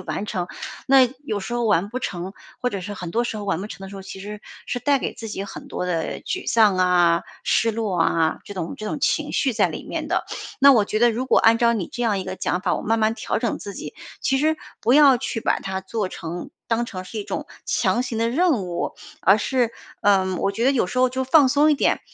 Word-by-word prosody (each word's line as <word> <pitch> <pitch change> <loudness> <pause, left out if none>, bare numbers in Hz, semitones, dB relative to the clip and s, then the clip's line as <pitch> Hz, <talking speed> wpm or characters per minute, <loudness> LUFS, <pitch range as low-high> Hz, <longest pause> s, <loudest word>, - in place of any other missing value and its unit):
完 195 +2 -4
成。 185 -4 -3 0.4
那 265 -2 +6 0.2
有 215 -6 -2
时 215 - -6
候 240 - 0
完 205 -3 +2
不 245 +4 -4
成 180 -4 -4 0.3
或 250 - 0
者 200 -4 -4
是 205 +3 -6
很 180 -3 -6
多 235 +5 +1
时 225 - -3
候 210 - -5
完 195 -3 -1
不 205 - -5
成 205 - -10
的 - - -8
时 - - -10
候， 195 - -8
其 190 0 -9
实 210 +1 -7 0.3
是 245 - -2
带 280 +1 +2
给 - - -3
自 225 - -7
己 195 - -4
很 200 - -9
多 - - -3
的 165 -3 -2
沮 375 - -4
丧 215 -4 +4
啊、 175 -2 +3 0.2
失 230 - +2
落 210 -5 -2
啊， 165 -1 +2
这 205 - -9
种 170 -3 -4
这 215 - -6
种 290 - -3
情 300 +1 +1
绪 270 - +1
在 225 - +2
里 - - -6
面 - - -4
的。 - - 0 0.4
那 280 0 +9
我 215 -5 +4
觉 215 - -1
得 240 0 +6
如 250 +4 -3
果 - - +4
按 225 0 +5
照 235 0 +4
你 200 -7 -2
这 245 - -5
样 210 -3 +1
一 185 - -5
个 185 0 -4
讲 180 - -1
法， - - 0
我 - - -4
慢 225 +1 +1
慢 220 0 +2
调 - - -2
整 - - -1
自 - - -7
己， - - -7 0.3
其 270 - +1
实 310 +3 +2 0.2
不 240 - +2
要 280 -3 +7
去 235 -2 -3
把 - - +1
它 190 0 -3
做 200 +1 -3
成 170 -1 -6 0.2
当 235 +1 +1
成 185 -6 -6
是 220 - -7
一 205 - -4
种 - - -4 0.2
强 245 - +1
行 245 -3 -4
的 230 0 +1
任 295 - +2
务， 175 -1 -3 0.3
而 195 +3 +5
是， 240 0 0 0.3
嗯 190 -2 +3
我 195 - 0
觉 225 +4 -1
得 265 - +5
有 250 -9 +1
时 255 - -3
候 255 - +5
就 260 +1 -2
放 275 0 +5
松 290 +3 +4
一 300 - +5
点。 - - +1
220 Hz, 280 characters per minute, -23 LUFS, 190-250 Hz, 0.4 s, 那